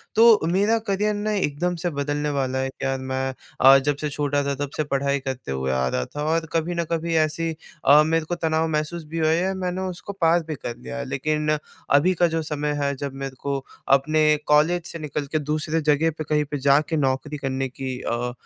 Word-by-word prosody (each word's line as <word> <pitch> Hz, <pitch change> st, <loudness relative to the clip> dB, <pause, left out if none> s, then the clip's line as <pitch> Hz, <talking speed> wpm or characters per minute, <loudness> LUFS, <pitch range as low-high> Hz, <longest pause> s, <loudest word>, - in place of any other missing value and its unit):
तो 225 Hz, -1 st, +7 dB
मेरा 205 Hz, +5 st, +3 dB
करियर 210 Hz, +2 st, +1 dB
ना 210 Hz, +1 st, -2 dB
एकदम 175 Hz, -2 st, 0 dB
से -, -, +2 dB
बदलने 145 Hz, 0 st, -2 dB
वाला 130 Hz, -2 st, -1 dB
है 135 Hz, 0 st, -1 dB
कि 135 Hz, -, -7 dB
यार 135 Hz, 0 st, -1 dB
मैं 130 Hz, 0 st, -2 dB, 0.3 s
अ, 135 Hz, +1 st, +9 dB
जब 140 Hz, +1 st, 0 dB
से 150 Hz, -, -1 dB
छोटा 145 Hz, 0 st, 0 dB
था 140 Hz, -, -1 dB
तब -, -, -11 dB
से 155 Hz, -, +1 dB
पढ़ाई 140 Hz, 0 st, 0 dB
करते 130 Hz, -, -5 dB
हुए 65 Hz, 0 st, -1 dB
आ 65 Hz, -1 st, +1 dB
रहा 65 Hz, 0 st, -1 dB
था 145 Hz, -, -2 dB
और 165 Hz, 0 st, 0 dB
कभी 165 Hz, +1 st, 0 dB
न 170 Hz, -, 0 dB
कभी 165 Hz, 0 st, -1 dB
ऐसी 160 Hz, +1 st, +1 dB, 0.3 s
अ, 145 Hz, +2 st, +7 dB
मेरे 160 Hz, 0 st, +1 dB
को 175 Hz, -, -2 dB
तनाव 160 Hz, -1 st, 0 dB
महसूस 160 Hz, +2 st, -2 dB
भी -, -, -1 dB
हुआ 155 Hz, 0 st, +3 dB
या 180 Hz, +4 st, +1 dB
मैंने 185 Hz, -1 st, -3 dB
उसको 200 Hz, +3 st, -8 dB
पार 165 Hz, +1 st, +4 dB
भी 155 Hz, -, -3 dB
कर 120 Hz, -2 st, -6 dB
लिया 65 Hz, 0 st, -7 dB
है। 65 Hz, -, -4 dB
लेकिन 150 Hz, -, 0 dB, 0.3 s
अभी 150 Hz, +7 st, +4 dB
का 175 Hz, 0 st, +3 dB
जो 165 Hz, 0 st, -1 dB
समय 150 Hz, 0 st, -1 dB
है 140 Hz, 0 st, +1 dB
जब 140 Hz, 0 st, -5 dB
मेरे 135 Hz, -1 st, -5 dB
को 140 Hz, -1 st, -2 dB, 0.4 s
अपने 155 Hz, +3 st, +1 dB, 0.2 s
कॉलेज 160 Hz, +4 st, +3 dB
से 170 Hz, -, -7 dB
निकल 150 Hz, -1 st, -3 dB
के 155 Hz, -, +1 dB
दूसरे 155 Hz, +2 st, -1 dB
जगह 150 Hz, +2 st, +2 dB
पे 155 Hz, -, -3 dB
कहीं 150 Hz, -1 st, +2 dB
पे 145 Hz, -, -1 dB
जाके 140 Hz, +4 st, +3 dB
नौकरी 140 Hz, +1 st, -1 dB
करने 135 Hz, -1 st, -2 dB
की 130 Hz, 0 st, -5 dB
अ 120 Hz, +1 st, -2 dB
150 Hz, 225 wpm, -23 LUFS, 135-165 Hz, 0.4 s, अ